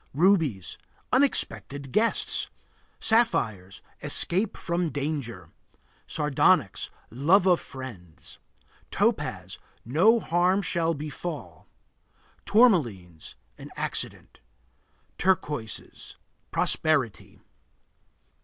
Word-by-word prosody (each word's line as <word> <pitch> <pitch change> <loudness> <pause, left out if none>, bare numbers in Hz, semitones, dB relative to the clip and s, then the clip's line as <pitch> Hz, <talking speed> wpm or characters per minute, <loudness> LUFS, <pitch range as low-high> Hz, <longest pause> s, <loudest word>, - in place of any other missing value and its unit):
Rubies 155 - +1 0.3
Unexpected 145 - +1
guests. 225 - 0 0.5
Sapphires 110 - 0 0.2
Escape 195 +4 +1
from 170 -1 -1
danger. 135 - -4 0.6
Sardonyx 150 -3 +1 0.2
Love 165 - +3
of 180 -2 +4
friends. 110 - -10 0.5
Topaz - - -1 0.3
No 185 - +4
harm 180 +2 +1
shall 165 -2 0
befall. 145 - -7 0.8
Tourmalines 120 - +2 0.2
An - - -10
accident. - - -4 0.8
Turquoises 150 - -2 0.3
Prosperity. 135 - 0
150 Hz, 70 wpm, -26 LUFS, 115-185 Hz, 0.8 s, of